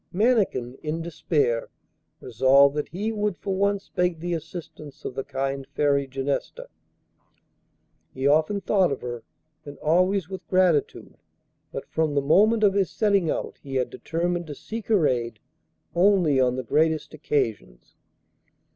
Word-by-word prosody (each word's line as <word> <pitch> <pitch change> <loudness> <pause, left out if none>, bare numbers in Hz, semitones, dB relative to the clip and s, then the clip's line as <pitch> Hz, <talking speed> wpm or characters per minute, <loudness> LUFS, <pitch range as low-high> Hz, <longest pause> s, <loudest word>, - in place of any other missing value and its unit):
Mannikin, 190 - +1
in 160 +2 -3
despair, 150 -8 -1 0.5
resolved 135 +4 +4
that 150 - -2
he 205 +6 -3
would 210 -4 -1
for 195 +6 -3
once 200 0 0
beg 180 -2 0
the 175 +1 -3
assistance 155 -3 -8
of - - -4
the 135 - -4
kind 135 0 -3
Fairy 140 -2 +2
Genesta. 140 - -4 1.4
He 130 +1 -5
often 155 +8 +3
thought 190 -3 +2
of 140 - -3
her 120 -1 -5 0.4
and 145 -1 -10
always 185 +3 +2
with 190 -1 -8
gratitude, 180 -5 +1 0.5
but - - -6
from 160 -2 -1
the 140 - +3
moment 215 +9 +4
of 200 -2 +5
his 195 -2 +1
setting 200 -6 +1
out - - -3
he 135 -1 -7
had 125 -1 0
determined 175 +1 -2
to 145 - -7
seek 220 +9 -7
her 205 -8 +3
aid 115 -3 -2 0.6
only 175 -6 +3
on 125 -1 +2
the 130 - -3
greatest 155 +5 +1
occasions. 110 - -3
160 Hz, 145 wpm, -25 LUFS, 135-190 Hz, 1.4 s, of